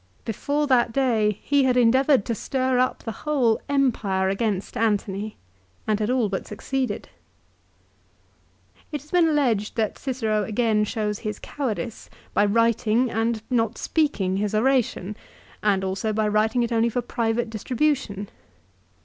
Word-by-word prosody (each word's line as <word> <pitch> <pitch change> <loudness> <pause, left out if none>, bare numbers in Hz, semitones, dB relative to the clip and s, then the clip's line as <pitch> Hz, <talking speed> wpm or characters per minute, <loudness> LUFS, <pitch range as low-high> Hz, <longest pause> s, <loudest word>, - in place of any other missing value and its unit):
Before 285 +7 -1
that 245 -4 +3
day 225 -6 +1
he 285 -2 +3
had 250 -1 +2
endeavoured 260 0 +4
to 235 - -1
stir 255 +2 0
up 255 - 0
the 225 - -4
whole 265 -7 +2
Empire 215 -9 +1
against 195 -1 -2
Antony, 210 -1 -1 0.5
and 215 -1 +1
had 215 +1 0
all 250 -3 +2
but 195 -1 -4
succeeded. 255 +5 -3 1.8
It 295 -3 -3
has 300 - -21
been 350 -2 +4
alleged 245 -9 +1
that 220 -3 -1
Cicero 225 -6 -1
again 215 0 +1
shows 210 -2 -2
his 210 -1 -4
cowardice 245 -4 -4 0.2
by 205 - +4
writing 230 +2 +2
and 225 0 -1
not 225 -3 +1
speaking 205 - 0
his 210 +1 -1
oration, 220 -4 +1 0.5
and 200 -2 +2
also 190 +3 -1
by 215 0 +1
writing 215 +3 +2
it 235 - -2
only 230 0 +2
for 245 +2 -2
private 230 0 -1
distribution. 230 -3 -1
225 Hz, 140 wpm, -24 LUFS, 210-255 Hz, 1.8 s, endeavoured